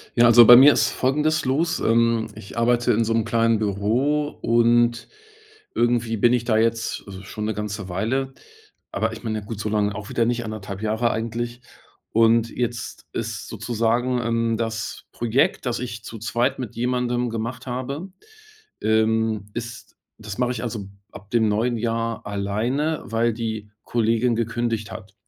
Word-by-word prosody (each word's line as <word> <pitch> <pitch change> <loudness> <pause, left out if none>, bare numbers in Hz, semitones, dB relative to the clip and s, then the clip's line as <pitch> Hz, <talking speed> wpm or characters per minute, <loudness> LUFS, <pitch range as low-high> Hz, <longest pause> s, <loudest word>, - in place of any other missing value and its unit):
Ja. 120 - +5
Also, 120 0 +9
bei 120 - +11
mir 140 +3 +9
ist - - +2
folgendes 150 +4 +1
los, 150 +6 0
ähm, 115 0 +2
ich 100 - -11
arbeite 120 +1 +3
in 115 +2 +2
so 115 - -1
'm 115 -1 +2
kleinen 115 0 +2
Büro. 115 +9 0
Und 120 0 +3 0.7
irgendwie 120 -1 +1
bin 120 +3 +4
ich 120 -2 +1
da 115 -2 +2
jetzt 115 0 0 0.2
schon 105 +2 -6
'ne 110 0 -1
ganze 105 -2 -5
Weile. 130 +9 -2 0.6
Aber 110 +2 -1
ich 115 - -9
meine 110 -2 -2
ja - - -13
gut, 105 0 -6
so 105 - -2
lange 105 -1 0
auch 105 0 -7
wieder 115 - +1
nicht 120 0 -1
1,5 105 -2 -6
Jahre 110 +2 +1
eigentlich. 120 +2 -3 0.5
Und 115 +1 +3
jetzt 120 -2 -4
ist - - -4
sozusagen, 120 +2 0
ähm, 115 0 0
das 110 -1 -4
Projekt, 120 +3 +1
das 120 - -1
ich 115 -3 -6
zu 115 - -8
2 120 +5 0
mit 125 -5 -6
jemandem 125 0 0
gemacht 115 +3 -5
habe. 130 +8 -4 0.7
Ähm, 110 -1 +1
ist 120 0 -7 0.3
das 105 -2 -7
mache 125 -1 +1
ich, - - -5
also, 110 -5 -5 0.2
ab 100 +1 -13
dem 115 -2 +3
neuen 115 +4 +1
Jahr 115 0 -2
alleine, 110 +10 -1
weil 115 +1 +1
die 110 -2 -4
Kollegin 115 +1 +1
gekündigt 115 -2 -2
hat, 95 0 -10
115 Hz, 165 wpm, -23 LUFS, 110-120 Hz, 0.7 s, bei